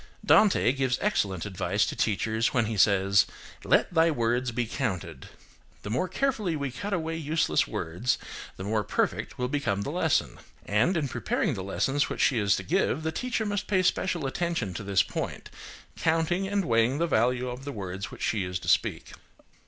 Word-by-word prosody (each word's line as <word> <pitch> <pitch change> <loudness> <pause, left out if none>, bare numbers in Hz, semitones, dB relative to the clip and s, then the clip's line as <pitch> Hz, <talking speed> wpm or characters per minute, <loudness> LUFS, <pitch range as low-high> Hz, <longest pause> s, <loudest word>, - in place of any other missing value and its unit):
Dante 210 - +5
gives 130 -2 0
excellent 100 - 0
advice 100 +1 0
to - - -4
teachers 110 +3 0
when 115 -2 +3
he 110 0 -3
says, 100 -1 +4 0.4
"Let - - +2
thy 165 0 +4
words 120 -2 0
be 120 +1 -1
counted." 110 - -4 0.5
The 105 - -5
more 130 +11 0
carefully 215 -4 -1
we 140 -3 -3
cut 200 +11 -5
away 165 -3 -1
useless 155 - +1
words, 90 +10 -1 0.4
the 95 - -6
more 105 +1 0
perfect - - -1
will 125 - -1
become 125 -8 -1
the - - -4
lesson. - - 0 0.3
And 115 - +2
in 150 -3 0
preparing - - -1
the 95 - -4
lessons 135 +9 0
which - - -3
she 125 -5 +3
is 100 -3 +3
to 95 - -4
give, 135 - 0
the 160 - -1
teacher 235 +4 -2
must 205 0 -2
pay 190 -2 +2
special 180 -3 0
attention 135 - -2
to 95 - -5
this 100 -1 +3
point, - - -5 0.4
counting 165 +3 +1
and 200 -1 0
weighing 115 +3 +2
the 170 - +1
value 125 -3 +1
of 125 +1 -6
the 145 - -5
words 95 -4 -5
which - - -9
she 105 -4 0
is 90 0 -3
to - - -9
speak. 80 -3 +1
125 Hz, 185 wpm, -27 LUFS, 100-165 Hz, 0.5 s, Dante